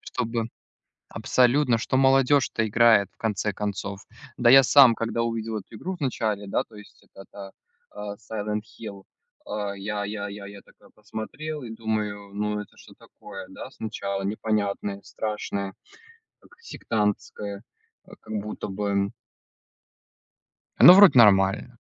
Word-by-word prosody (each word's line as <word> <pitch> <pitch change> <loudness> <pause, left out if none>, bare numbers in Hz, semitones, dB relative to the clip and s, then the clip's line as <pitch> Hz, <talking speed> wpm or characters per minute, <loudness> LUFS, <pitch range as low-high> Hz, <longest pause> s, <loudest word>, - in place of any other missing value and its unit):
Чтобы 115 -2 -3 0.6
Абсолютно, 125 0 +2
что 115 - -2
молодежь-то 135 -3 +3
играет 110 -3 +4
в - - -40
конце 105 -2 -2
концов. 100 -1 -4 0.4
Да 120 - +4
я 135 +2 +9
сам, 130 -2 +7
когда 115 0 -2
увидел 115 -1 -3
эту 105 - -14
игру 185 - -5
в 175 - -17
начале, 110 -6 -2
да, - - 0
то 110 - -19
есть, 105 0 -15
это 95 - -15
та 100 -1 -10 0.4
а, 105 0 -7
Silent 105 0 -4 0.2
Hill, 100 -3 -8 0.4
а, 105 -1 -4
я 105 +1 -3
я 105 0 -5
я 100 0 -9
я 100 0 -11
такой - - -22
посмотрел 145 +9 -7
и 120 - -8
думаю, 105 -3 -4
ну, 105 +1 -2
это 105 - -10
что - - -16
такое, 95 -2 -11
да, 95 - -9
сначала 100 -4 -5
непонятное 100 -1 -2
страшное, 100 -2 -4 0.7
как - - -22
сектантское, 105 - -3 0.4
а, - - -18
как - - -10
будто 105 +1 -6
бы 100 0 -1 1.7
оно 175 - +10
вроде 190 -8 +8
нормально. 105 +2 +4
105 Hz, 140 wpm, -25 LUFS, 100-115 Hz, 1.7 s, оно